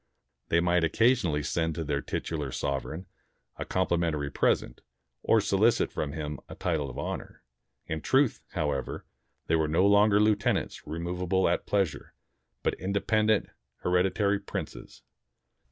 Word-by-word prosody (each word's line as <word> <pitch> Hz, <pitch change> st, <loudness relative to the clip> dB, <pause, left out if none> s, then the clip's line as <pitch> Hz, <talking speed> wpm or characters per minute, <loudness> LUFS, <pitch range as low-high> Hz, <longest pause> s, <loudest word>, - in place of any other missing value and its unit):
They 85 Hz, -, +4 dB
might 90 Hz, 0 st, +2 dB
occasionally 90 Hz, -, +2 dB
send 80 Hz, +1 st, -1 dB
to 85 Hz, -, -3 dB
their 70 Hz, -1 st, -1 dB
titular 75 Hz, -4 st, -3 dB
sovereign 70 Hz, +7 st, -3 dB, 0.5 s
a -, -, -3 dB
compli 90 Hz, -2 st, 0 dB
mentary 75 Hz, -4 st, -1 dB
present, -, -, +1 dB, 0.4 s
or 115 Hz, -, +4 dB
solicit 105 Hz, +3 st, +2 dB
from 70 Hz, -2 st, -3 dB
him 75 Hz, -2 st, -4 dB
a -, -, -8 dB
title 80 Hz, -6 st, -1 dB
of 65 Hz, -, -9 dB
honor. -, -, -5 dB, 0.4 s
In 80 Hz, 0 st, -4 dB
truth, 135 Hz, -, +2 dB
however, 75 Hz, -6 st, -2 dB, 0.4 s
they 80 Hz, -, +2 dB
were 80 Hz, -1 st, +2 dB
no 80 Hz, +5 st, +3 dB
longer 100 Hz, +1 st, +5 dB
lieutenants 105 Hz, -1 st, +1 dB
remov 85 Hz, +3 st, -4 dB
able 95 Hz, +1 st, +2 dB
at 85 Hz, -, 0 dB
pleasure, 100 Hz, -7 st, -1 dB, 0.5 s
but -, -, +1 dB
independent 105 Hz, +3 st, +1 dB, 0.3 s
hereditary 95 Hz, +3 st, +2 dB
princes. 100 Hz, -, -7 dB
85 Hz, 135 wpm, -28 LUFS, 75-100 Hz, 0.5 s, longer